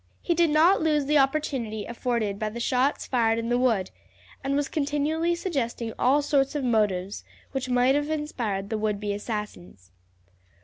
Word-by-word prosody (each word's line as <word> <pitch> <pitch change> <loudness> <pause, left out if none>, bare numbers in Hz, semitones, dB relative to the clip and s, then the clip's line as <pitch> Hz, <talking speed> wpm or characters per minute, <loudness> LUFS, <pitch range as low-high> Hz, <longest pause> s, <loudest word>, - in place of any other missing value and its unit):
He 345 - +1
did 340 -1 +3
not 320 +6 +4
lose 300 -3 +2
the 295 +1 +3
opportunity 265 -7 -1
afforded 235 -4 -2
by 215 - -1
the 230 +3 -7
shots 255 +4 +1
fired 230 -3 +1
in 230 0 -2
the 245 0 +2
wood, 225 -7 +1 0.5
and 275 +1 0
was 285 -1 0
continually 305 +4 0
suggesting 245 - -3
all 280 +4 +3
sorts 280 0 +1
of 290 - -1
motives 205 -5 0 0.3
which 265 -1 -3
might 250 +1 +3
have 290 +1 0
inspired 235 -10 -3
the 220 - -1
would 210 -1 -1
be 205 -1 -2
assassins. 205 - -6
250 Hz, 170 wpm, -26 LUFS, 215-290 Hz, 0.5 s, not